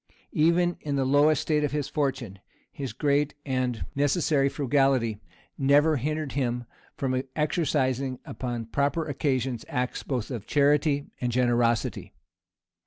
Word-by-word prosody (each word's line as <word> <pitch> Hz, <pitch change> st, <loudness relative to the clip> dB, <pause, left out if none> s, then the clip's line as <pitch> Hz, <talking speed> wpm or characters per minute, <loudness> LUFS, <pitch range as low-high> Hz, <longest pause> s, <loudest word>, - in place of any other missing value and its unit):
Even 175 Hz, +3 st, +3 dB
in 145 Hz, -2 st, -2 dB
the 135 Hz, -1 st, +1 dB
lowest 145 Hz, +2 st, +4 dB
state 150 Hz, -1 st, +1 dB
of 145 Hz, -, -1 dB
his 145 Hz, -2 st, -1 dB
fortune, 135 Hz, -9 st, -2 dB, 0.3 s
his 135 Hz, -4 st, -5 dB
great 145 Hz, +4 st, +1 dB
and 130 Hz, -4 st, -1 dB
necessary 145 Hz, -1 st, +2 dB
frugality 135 Hz, -6 st, +1 dB, 0.4 s
never 145 Hz, +3 st, +4 dB
hindered 150 Hz, +2 st, -2 dB
him 125 Hz, -3 st, -1 dB, 0.3 s
from 130 Hz, -1 st, 0 dB
exercising, 135 Hz, -4 st, 0 dB
upon 120 Hz, -3 st, -4 dB
proper 140 Hz, +7 st, 0 dB
occasions, 130 Hz, -4 st, -1 dB
acts 125 Hz, -2 st, -2 dB
both 125 Hz, -3 st, -3 dB
of 115 Hz, -5 st, -5 dB
charity 145 Hz, 0 st, +2 dB, 0.2 s
and 125 Hz, -1 st, 0 dB
generosity. 120 Hz, -2 st, +1 dB
140 Hz, 125 wpm, -27 LUFS, 125-150 Hz, 0.4 s, lowest